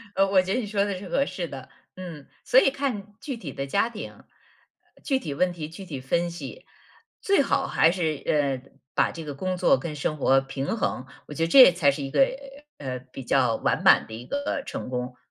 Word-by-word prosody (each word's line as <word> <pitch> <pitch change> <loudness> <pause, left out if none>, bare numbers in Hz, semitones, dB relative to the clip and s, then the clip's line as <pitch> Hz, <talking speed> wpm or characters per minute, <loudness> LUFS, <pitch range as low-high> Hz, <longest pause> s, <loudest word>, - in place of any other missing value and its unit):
呃， 195 +1 +4
我 195 -1 +5
觉 185 +1 -2
得 250 - +1
你 220 - -4
说 200 -1 +1
的 200 -2 -3
是 185 -1 -9
合 275 - +2
适 175 -9 -4
的。 135 -3 -9 0.3
嗯， 170 -6 -9 0.2
所 260 - +6
以 - - +4
看 235 -8 -3
具 265 -3 -5
体 165 -11 -7
的 135 - -4
家 200 +11 +1
庭， 225 -2 -7 0.7
呃， - - -27
具 270 - +1
体 155 - -5
问 180 +5 +1
题 165 -3 -6
具 190 +4 -10
体 140 -6 -6
分 170 +6 0
析。 175 - -9 0.6
最 395 -6 +3
好 - - +1
还 160 - +4
是， 160 -5 -2
呃， 135 -3 0 0.2
把 - - +2
这 165 - -8
个 145 - -6
工 185 +6 -3
作 270 +9 +4
跟 160 -3 -5
生 150 +1 -2
活 135 -1 +4
平 135 +8 -4
衡， 130 - -2 0.2
我 - - -8
觉 165 - -1
得 165 - +2
这 255 +1 +9
才 165 -4 +3
是 140 +1 -2
一 135 - -5
个， - - +3 0.6
呃， 130 -3 -5
比 130 +1 -11
较 125 -2 +2
完 - - 0
满 - - +6
的 110 - -10
一 115 +2 -8
个 285 0 -2
成 - - -6
功。 125 0 -4
165 Hz, 245 characters per minute, -25 LUFS, 135-200 Hz, 0.7 s, 这